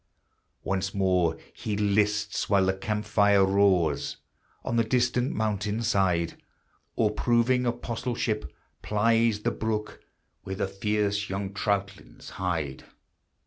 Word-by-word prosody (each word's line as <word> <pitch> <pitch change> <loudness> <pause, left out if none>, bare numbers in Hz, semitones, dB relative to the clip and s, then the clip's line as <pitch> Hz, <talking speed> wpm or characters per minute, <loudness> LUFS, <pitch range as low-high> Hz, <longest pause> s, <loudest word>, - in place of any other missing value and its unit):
Once 95 0 -2
more 90 -4 +2 0.2
he 110 -4 -4
lists 105 0 +1
while 100 -2 +4
the 95 - +2
camp 105 +2 -3
fire 100 -2 +4
roars 95 -6 +2 0.5
On 115 - -2
the 115 - +4
distant 125 +2 +1
mountain 105 +1 -1
side, 90 -6 +1 0.5
Or, 110 -2 +2
proving 120 +3 +2
apostleship, 120 - -2 0.3
plies 115 0 +2
the - - 0
brook 105 -1 -3 0.4
Where 95 - -5
the 100 - -1
fierce 105 +1 -1
young 95 0 -3
troutlings 100 0 -3
hide. 80 -7 -3
105 Hz, 115 wpm, -27 LUFS, 95-110 Hz, 0.5 s, while